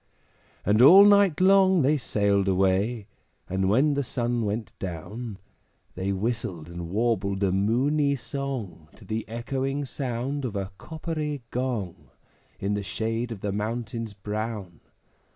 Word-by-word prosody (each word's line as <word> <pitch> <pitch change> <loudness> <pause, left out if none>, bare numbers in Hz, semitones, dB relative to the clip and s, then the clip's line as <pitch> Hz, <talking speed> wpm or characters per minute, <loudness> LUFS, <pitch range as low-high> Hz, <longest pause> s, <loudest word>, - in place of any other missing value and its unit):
And 105 +3 +4
all 185 +10 +10
night 200 -5 +5
long 190 -2 +5
they 145 +4 +4
sailed 100 -6 +1
away; 95 +4 +1 0.4
And 95 0 0
when 135 +8 +3
the 140 - 0
sun 120 -3 -1
went 105 +2 -3
down, 100 +5 -6 0.6
They 95 +2 -2
whistled 95 -5 -3
and 85 -1 -6
warbled 100 -2 0
a 95 - +2
moony 135 +9 +2
song 120 - -5
To 110 - -16
the 110 +2 -4
echoing 135 +4 -2
sound 135 +1 -3
of 120 -5 -3
a 100 0 -3
coppery 155 -4 -4
gong, 100 - -3 0.5
In 100 +1 -1
the 105 - -1
shade 115 +4 -3
of 105 -4 -6
the 100 - -2
mountains 110 +1 -4
brown. 105 -3 -5
115 Hz, 135 wpm, -26 LUFS, 100-135 Hz, 0.6 s, all